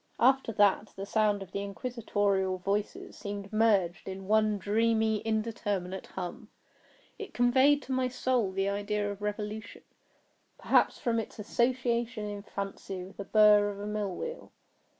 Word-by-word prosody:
After 265 -1 +4
that, 205 0 +3
the 195 - -5
sound 205 -1 +1
of 190 - -15
the 200 - -3
inquisitorial 200 -3 -1
voices 200 +3 -3
seemed 200 0 -6
merged 200 -6 +2
in 190 0 -7
one 215 0 +3
dreamy 220 +1 +2
indeterminate 210 -4 -2
hum. 210 +5 -7 0.7
It 415 - -8
conveyed 260 +4 +4
to 265 - -8
my 260 -1 +1
soul 250 -4 0
the 195 +1 -1
idea 205 +1 -1
of 200 0 -8
revolution—perhaps 210 +1 -3
from 235 -3 0
its 220 - -6
association 235 0 0
in 205 -1 -5
fancy 195 -2 -6
with 190 +2 -12
the 200 - -5
burr 210 0 +6
of 200 -1 -7
a 205 - -5
mill 210 -3 -2
wheel. 480 +1 -6
210 Hz, 145 wpm, -30 LUFS, 200-230 Hz, 0.7 s, burr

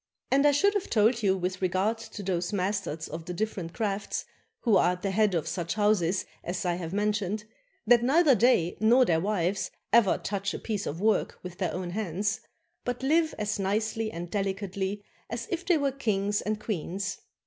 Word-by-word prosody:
And 275 +2 +5
I - - +6
should 400 +9 +3
have 405 -3 -2
told 225 +2 +3
you 190 -2 +2
with 185 +1 -3
regard 190 +5 +1
to 210 -2 -8
those 180 -2 -1
masters 190 -5 -2
of 160 0 -7
the 180 - -5
differ 215 +2 -2
ent 165 0 -7
crafts 200 -2 -2 0.4
who 225 -5 +3
are 180 -1 +4
at 180 - -9
the 195 - 0
head 205 -1 +2
of 160 - -1
such 170 0 -2
houses 205 -4 +2 0.2
as 175 +2 -3
I 175 - +2
have 170 -2 -4
mentioned, 210 0 0 0.4
that 240 +1 +6
neither 285 +4 +5
they 225 -7 +3
nor 240 +4 +5
their 165 -6 +2
wives 190 0 0 0.2
ever 230 -5 +5
touch 200 0 -3
a - - -2
piece 210 -3 -3
of 165 +5 -4
work 215 -1 +1
with 180 -1 -8
their 185 -4 0
own 180 -1 -4
hands, 200 +1 -1 0.4
but 245 +1 -3
live 315 +3 +2
as 210 -1 -2
nicely 215 +3 0
and 170 -1 -6
delicately 195 0 -2 0.3
as - - -4
if 350 0 -3
they 350 -3 +5
were 280 -2 +1
kings 205 -6 0
and 215 +1 -2
queens. 200 -1 -3
200 Hz, 195 wpm, -28 LUFS, 185-220 Hz, 0.4 s, I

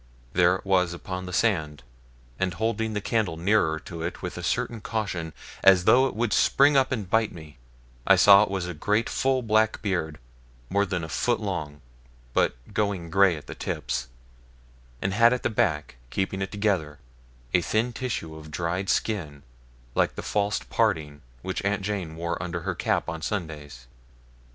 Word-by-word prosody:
There 90 0 +4
it 95 - -8
was 90 -3 +2
upon 90 +1 -6
the - - -6
sand, 80 - 0 0.6
and 95 -2 -1
holding 110 +1 -1
the 105 - -2
candle 105 -6 0
nearer 85 -3 +2
to 85 -2 -8
it 85 +3 -5
with 90 - -4
a 90 - -6
certain 115 +5 -1
caution, 100 -8 -3 0.3
as 95 -2 +7
though 125 +7 +5
it - - -6
would 115 0 0
spring 140 +1 +4
up 135 -1 +3
and 110 -7 -2
bite 110 +2 +2
me, 80 -5 -12 0.5
I - - +8
saw 100 -1 +8
it 105 - +1
was 95 -2 -2
a 90 - -4
great 105 +8 0
full 130 -1 0
black 110 0 +2
beard, 85 -7 -1 0.5
more 100 +1 +2
than 95 -3 -2
a - - -4
foot 110 +10 0
long, 75 -8 -4 0.5
but - - +2 0.2
going 100 -6 -1
grey 95 -2 +4
at 75 - -11
the - - -7
tips; 60 - -3 1.0
and 95 - 0
had 115 +3 +5
at 125 - -3
the - - 0
back, 80 - 0
keeping 95 +3 -2
it 95 - -3
together, 95 -8 -1 0.6
a 90 - +4
thin 115 +7 0
tissue 115 -11 -4
of 80 0 -10
dried 90 +4 -2
skin, 80 -10 -1 0.5
like - - +1
the - - -6
false 105 0 0
parting 75 -2 0 0.2
which - - -3
Aunt 100 0 0
Jane 95 -6 -3
wore 85 +1 -3
under 85 -1 -4
her 95 +2 -2
cap 85 - 0
on 85 -2 -4
Sundays. 75 -9 -5
95 Hz, 180 wpm, -26 LUFS, 80-110 Hz, 1.0 s, I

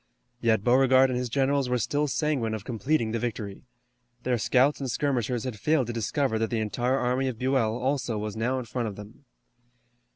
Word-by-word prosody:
Yet 110 -4 +2
Beauregard 130 +1 +5
and 125 - -1
his 125 -1 -3
generals 135 +1 +1
were 125 - +2
still 145 +6 0
sanguine 135 -7 0
of 105 - -8
completing 120 0 0
the 115 - -1
victory. 110 -2 -5 0.6
Their 125 -2 0
scouts 130 +6 +3
and 135 -2 -3
skirmishers 125 -3 -1
had 125 -5 -5
failed 150 +1 +2
to 120 - -4
discover 115 +1 0
that 115 - 0
the 115 - -1
entire 120 +5 0
army 125 +1 0
of 125 -3 -3
Buell 125 -3 +1
also 125 -3 -1
was 105 0 -4
now 120 +4 0
in 130 - -4
front 120 0 -3
of 105 - -6
them. 105 +7 -12
125 Hz, 195 wpm, -27 LUFS, 110-135 Hz, 0.6 s, Beauregard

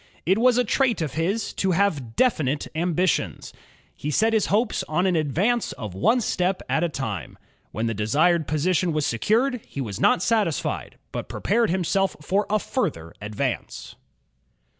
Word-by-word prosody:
It 190 +5 +3
was 250 0 +4
a 250 - +4
trait 245 -1 +1
of 150 - -4
his 190 +7 -1
to 190 -1 0
have 155 - 0
definite 150 - +1
ambitions. 175 +2 -1 0.4
He 150 - -4
set 220 +9 +2
his 220 -3 +2
hopes 215 +4 +1
on 175 +4 +1
an 185 -2 +2
advance 180 - +1
of 105 -5 -7
one 230 - +2
step 185 -2 0
at 160 - +1
a 170 - +1
time. 110 - -5 0.3
When 110 - -2
the 115 - 0
desired 150 - +2
position 170 +3 +1
was 155 -1 0
secured, 230 - +1
he - - -9
was 105 -6 -4
not 170 - +3
satisfied, 210 -9 -1
but - - -5
prepared 230 +1 +1
himself 190 +2 +1
for 195 +7 0
a 215 - +3
further 85 - -3
advance. 105 0 -4
175 Hz, 160 wpm, -24 LUFS, 145-210 Hz, 0.4 s, was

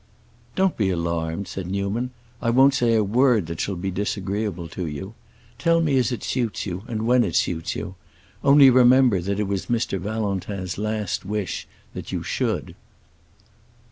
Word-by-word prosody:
"Don't 190 -1 +1
be 100 -4 +1
alarmed," 85 +1 -2
said 90 +1 -6
Newman. 100 +6 -2 0.3
"I 115 - 0
won't 135 +3 +5
say 120 -4 +2
a 110 - +3
word 115 -1 +3
that 85 0 -6
shall 100 - -2
be 95 +2 -3
disagreeable 100 -2 -3
to 90 -3 -4
you. 80 +8 -6 0.5
Tell 165 +4 +3
me 155 -4 +1
as 125 - +1
it 120 - -4
suits 120 -5 -2
you, 90 -2 -4
and 110 -2 -3
when 125 +1 +4
it 90 -7 -2
suits 80 -2 0
you. 95 - -5 0.5
Only 140 -1 +7
remember 125 -5 +5
that 100 +3 -2
it 105 - 0
was 100 -1 -2
Mr. 115 -5 -1
Valentin's 100 -2 -3
last 105 -2 -2
wish 100 -3 -3 0.3
that - - -7
you - - -3
should." - - -2
105 Hz, 170 wpm, -23 LUFS, 95-120 Hz, 0.5 s, Only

